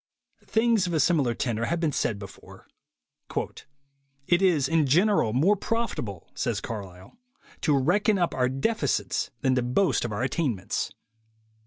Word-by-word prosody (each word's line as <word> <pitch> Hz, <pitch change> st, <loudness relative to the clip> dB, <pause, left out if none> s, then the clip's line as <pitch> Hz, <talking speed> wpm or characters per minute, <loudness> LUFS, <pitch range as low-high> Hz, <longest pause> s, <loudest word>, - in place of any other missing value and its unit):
Things 225 Hz, -4 st, +2 dB
of 175 Hz, -, -3 dB
a -, -, +2 dB
similar 145 Hz, -6 st, +2 dB
tenor 115 Hz, -1 st, -1 dB
have 170 Hz, +7 st, -1 dB
been 160 Hz, -3 st, +1 dB
said 110 Hz, -5 st, -1 dB
before. 100 Hz, -1 st, -12 dB, 1.6 s
"It 175 Hz, +4 st, +3 dB
is 165 Hz, -8 st, +3 dB
in 160 Hz, -1 st, +2 dB
general 175 Hz, -, +3 dB
more 160 Hz, -, +3 dB
profitable," 200 Hz, -, -3 dB
says -, -, -1 dB
Carlyle, 95 Hz, -, -8 dB, 0.4 s
"to 150 Hz, -3 st, +3 dB
reckon 200 Hz, +9 st, +2 dB
up 175 Hz, -2 st, 0 dB
our 125 Hz, -1 st, +1 dB
defects 215 Hz, -, -1 dB
than 130 Hz, -2 st, +2 dB
to 125 Hz, -, +2 dB
boast 130 Hz, +5 st, +1 dB
of 120 Hz, -, -3 dB
our 105 Hz, +3 st, -2 dB
attain 135 Hz, -2 st, 0 dB
ments." 95 Hz, -1 st, -3 dB
145 Hz, 150 wpm, -26 LUFS, 120-180 Hz, 1.6 s, It